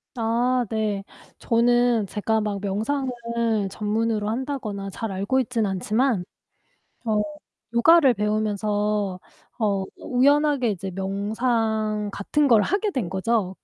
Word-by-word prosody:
아 240 Hz, +2 st, +1 dB
네. 210 Hz, -3 st, -1 dB, 0.3 s
저는 240 Hz, -2 st, +2 dB
제가 220 Hz, +2 st, 0 dB
막 210 Hz, -2 st, -2 dB
명상을 230 Hz, +7 st, -1 dB, 0.6 s
전문으로 215 Hz, +1 st, -1 dB
한다거나 225 Hz, -6 st, -3 dB
잘 220 Hz, +1 st, -5 dB
알고 200 Hz, +8 st, 0 dB
있진 235 Hz, -3 st, -1 dB
않지만 210 Hz, +3 st, 0 dB, 0.8 s
어 215 Hz, -2 st, +1 dB, 0.5 s
요가를 275 Hz, +2 st, +6 dB
배우면서 210 Hz, -2 st, -1 dB, 0.4 s
어 200 Hz, -4 st, +1 dB
우연하게 280 Hz, 0 st, +2 dB
이제 195 Hz, -1 st, -4 dB
명상 215 Hz, +2 st, -1 dB
같은 285 Hz, +9 st, +1 dB
걸 225 Hz, -3 st, +6 dB
하게 405 Hz, -, 0 dB
된 250 Hz, -, -2 dB
거죠. 190 Hz, +1 st, 0 dB
220 Hz, 225 characters per minute, -24 LUFS, 205-245 Hz, 0.8 s, 요가를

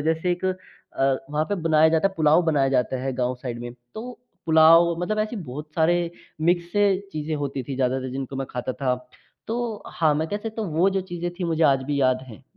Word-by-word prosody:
जैसे 160 Hz, +2 st, +1 dB
एक 175 Hz, +1 st, -5 dB
अ, 185 Hz, 0 st, +1 dB, 0.8 s
वहाँ 150 Hz, +1 st, 0 dB
पे 205 Hz, -, 0 dB
बनाया 160 Hz, -1 st, +5 dB
जाता 160 Hz, +4 st, +3 dB
है 195 Hz, -, -14 dB
पुलाव 155 Hz, +2 st, +4 dB
बनाया 145 Hz, -4 st, +2 dB
जाता 125 Hz, +1 st, 0 dB
है 135 Hz, 0 st, -1 dB
गाँव 125 Hz, 0 st, 0 dB
साइड 120 Hz, -2 st, -4 dB
में 120 Hz, 0 st, -6 dB, 0.2 s
तो 245 Hz, +3 st, -7 dB, 0.3 s
पुलाव 165 Hz, +1 st, +6 dB
मतलब 215 Hz, +4 st, -1 dB
ऐसे 215 Hz, +2 st, -1 dB
बहुत 150 Hz, -3 st, -7 dB
सारे 170 Hz, +2 st, +3 dB, 0.4 s
मिक्स 170 Hz, +2 st, +2 dB
से 205 Hz, 0 st, +4 dB, 0.3 s
चीज़ें 155 Hz, 0 st, -3 dB
होती 140 Hz, -2 st, -3 dB
थी 135 Hz, +2 st, -5 dB
ज़्यादातर 130 Hz, 0 st, 0 dB
जिनको 135 Hz, 0 st, -5 dB
मैं 135 Hz, -, -3 dB
खाता 125 Hz, +1 st, -3 dB
था। 130 Hz, -2 st, 0 dB, 0.5 s
तो 230 Hz, -2 st, -3 dB
हाँ, 155 Hz, -2 st, +1 dB
मैं 160 Hz, +2 st, -1 dB
कह 205 Hz, -, -2 dB
सकता 220 Hz, +1 st, -5 dB
हूँ 165 Hz, -7 st, -4 dB
वो 190 Hz, +3 st, +5 dB
जो -, -, +2 dB
चीज़ें 175 Hz, -2 st, -4 dB
थी 185 Hz, -, -2 dB
मुझे 165 Hz, -1 st, 0 dB
आज 135 Hz, -3 st, +4 dB
भी 140 Hz, +1 st, -1 dB
याद 130 Hz, -1 st, +2 dB
हैं। 115 Hz, +3 st, -12 dB
160 Hz, 220 wpm, -24 LUFS, 135-175 Hz, 0.8 s, पुलाव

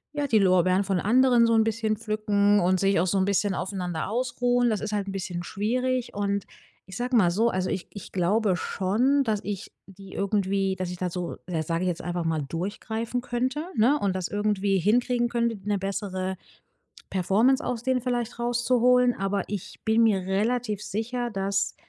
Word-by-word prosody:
ja, 290 Hz, -1 st, -1 dB
die 230 Hz, -5 st, +3 dB
Lorbeeren 185 Hz, 0 st, +3 dB
von 195 Hz, -2 st, 0 dB
anderen 245 Hz, +3 st, +4 dB
so 230 Hz, -, +3 dB
'n 220 Hz, -, +5 dB
bisschen 220 Hz, -1 st, -1 dB
pflücken 210 Hz, -2 st, +2 dB
und 185 Hz, +1 st, +2 dB
sich 195 Hz, -1 st, +2 dB
auch 180 Hz, -, +1 dB
so 195 Hz, -, +1 dB
'n 190 Hz, -, +2 dB
bisschen 200 Hz, 0 st, +1 dB
aufeinander 180 Hz, -3 st, -3 dB
ausruhen. 245 Hz, +1 st, +1 dB
Das 215 Hz, -2 st, 0 dB
ist 215 Hz, 0 st, -4 dB
halt 205 Hz, -1 st, -1 dB
'n -, -, -3 dB
bisschen 185 Hz, -3 st, -4 dB
schwierig. 250 Hz, +6 st, -1 dB
Und, 200 Hz, -1 st, -1 dB, 0.4 s
ich 190 Hz, 0 st, -9 dB
sage 245 Hz, +1 st, -1 dB
mal 185 Hz, -7 st, +5 dB
so, 225 Hz, +6 st, +2 dB
also, 185 Hz, -3 st, -1 dB
ich 185 Hz, -, -3 dB
ich 200 Hz, -, -10 dB
glaube 195 Hz, +2 st, +1 dB
schon, 245 Hz, +13 st, +1 dB
dass 220 Hz, -4 st, 0 dB
ich 205 Hz, -1 st, -5 dB, 0.2 s
die 195 Hz, 0 st, -13 dB
irgendwie 195 Hz, -1 st, 0 dB
dass 185 Hz, -1 st, -3 dB
ich 180 Hz, -, -6 dB
da 180 Hz, 0 st, -2 dB
so, 175 Hz, -1 st, -5 dB
äh, 165 Hz, -3 st, -2 dB
sage 165 Hz, +2 st, -2 dB
ich -, -, 0 dB
jetzt 175 Hz, -, -3 dB
einfach 175 Hz, 0 st, -3 dB
mal, 160 Hz, -2 st, 0 dB
durchgreifen 220 Hz, -, -3 dB
könnte, 255 Hz, +4 st, -2 dB
ne? 245 Hz, +6 st, +4 dB
Und 195 Hz, -2 st, 0 dB
das 185 Hz, -2 st, -2 dB
irgendwie 205 Hz, -1 st, 0 dB
hinkriegen 240 Hz, +5 st, +2 dB
könnte, 235 Hz, -2 st, 0 dB
'ne 205 Hz, 0 st, 0 dB
bessere 190 Hz, -1 st, -3 dB, 0.8 s
Performance 210 Hz, -, +2 dB
aus 235 Hz, -2 st, -3 dB
denen 260 Hz, -1 st, 0 dB
vielleicht 240 Hz, -1 st, -2 dB
rauszuholen. 245 Hz, +1 st, +3 dB
Aber 195 Hz, 0 st, -1 dB
ich 205 Hz, -3 st, -6 dB
bin 220 Hz, +1 st, +3 dB
mir 210 Hz, -4 st, +3 dB
relativ 210 Hz, +2 st, -1 dB
sicher, 240 Hz, +4 st, -3 dB
dass 195 Hz, -1 st, -1 dB
205 Hz, 190 wpm, -26 LUFS, 190-240 Hz, 0.8 s, n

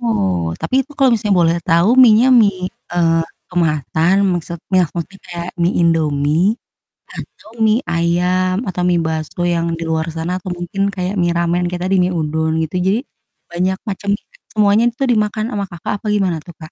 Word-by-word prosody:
Oh, 90 Hz, -, -1 dB
tapi -, -, -4 dB
itu 280 Hz, +3 st, -16 dB
kalau 270 Hz, -2 st, +4 dB
misalnya 210 Hz, -3 st, +1 dB
boleh 165 Hz, 0 st, +3 dB
tahu 170 Hz, +4 st, +2 dB
mienya 240 Hz, 0 st, +7 dB
mie, 200 Hz, -6 st, +3 dB, 0.2 s
eee, 165 Hz, -1 st, +2 dB, 0.3 s
kemasan, 165 Hz, +1 st, +1 dB, 0.2 s
maksudnya 175 Hz, +2 st, -1 dB
seperti 170 Hz, +3 st, -6 dB
kayak 175 Hz, 0 st, -6 dB
mie 170 Hz, +2 st, +2 dB
Indomie 160 Hz, +3 st, +2 dB, 0.6 s
atau 215 Hz, -, -11 dB
mie 220 Hz, +4 st, +3 dB
ayam 180 Hz, +4 st, 0 dB
atau 185 Hz, -2 st, -3 dB
mie 175 Hz, -1 st, +3 dB
bakso 160 Hz, +2 st, -3 dB
yang 170 Hz, -1 st, 0 dB
di -, -, -3 dB
luar 160 Hz, 0 st, -1 dB
sana 170 Hz, +3 st, -2 dB
atau 185 Hz, -, -6 dB
mungkin 195 Hz, +3 st, -2 dB
kayak 185 Hz, 0 st, -2 dB
mie 175 Hz, 0 st, +2 dB
ramen 175 Hz, +1 st, 0 dB
kayak 180 Hz, 0 st, -4 dB
tadi, -, -, +4 dB
mie 180 Hz, -, +2 dB
udon 160 Hz, 0 st, -1 dB
gitu 160 Hz, +2 st, -6 dB
jadi 190 Hz, +5 st, +1 dB, 0.5 s
banyak 185 Hz, +2 st, 0 dB
macam 200 Hz, +1 st, -4 dB
juga -, -, -18 dB, 0.2 s
semuanya 210 Hz, 0 st, +3 dB
itu 240 Hz, +3 st, -5 dB
dimakan 215 Hz, -1 st, 0 dB
ama 200 Hz, -1 st, -2 dB
Kakak 175 Hz, +4 st, -5 dB
apa -, -, -6 dB
gimana 195 Hz, -5 st, +1 dB
tuh, 175 Hz, -, -12 dB
Kak? 155 Hz, 0 st, -11 dB
180 Hz, 175 wpm, -17 LUFS, 165-200 Hz, 0.6 s, mienya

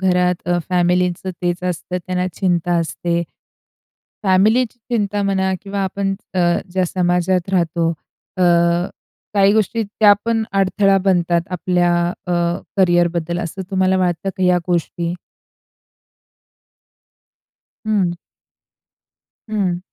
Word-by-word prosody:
घरात 180 Hz, -1 st, +1 dB
अ, 175 Hz, 0 st, +2 dB
फॅमिलीचं 180 Hz, +1 st, +1 dB
तेच 175 Hz, 0 st, -1 dB
असतं 180 Hz, +1 st, -3 dB
त्यांना 180 Hz, 0 st, -1 dB
चिंता 175 Hz, -2 st, 0 dB
असते." 170 Hz, +1 st, -1 dB, 1.0 s
फॅमिलीची 215 Hz, +6 st, +2 dB
चिंता 205 Hz, -3 st, 0 dB
म्हणा 190 Hz, -1 st, +1 dB
किंवा 200 Hz, 0 st, -4 dB
आपण 195 Hz, +1 st, -2 dB, 0.2 s
अ, 185 Hz, -, +1 dB, 0.3 s
ज्या 185 Hz, 0 st, +1 dB
समाजात 180 Hz, 0 st, 0 dB
राहतो 170 Hz, -2 st, +1 dB, 0.5 s
अ, 185 Hz, -, 0 dB, 0.9 s
काही 200 Hz, 0 st, +5 dB
गोष्टी 220 Hz, +1 st, +1 dB
त्यापण 215 Hz, +2 st, +2 dB
अडथळा 195 Hz, 0 st, +3 dB
बनतात 175 Hz, -2 st, +2 dB
आपल्या 180 Hz, -1 st, +1 dB, 0.3 s
अ, 180 Hz, -, -1 dB, 0.4 s
करियरबद्दल 175 Hz, -2 st, +2 dB
असं 180 Hz, +3 st, -5 dB
तुम्हाला 190 Hz, -1 st, +2 dB
वाटतं 180 Hz, +1 st, 0 dB
का 190 Hz, -, -3 dB
ह्या 180 Hz, -1 st, +4 dB
गोष्टी? 170 Hz, 0 st, -1 dB, 2.7 s
हं. 190 Hz, -5 st, +1 dB, 1.3 s
हं. 190 Hz, -5 st, 0 dB
180 Hz, 100 wpm, -19 LUFS, 175-195 Hz, 2.7 s, काही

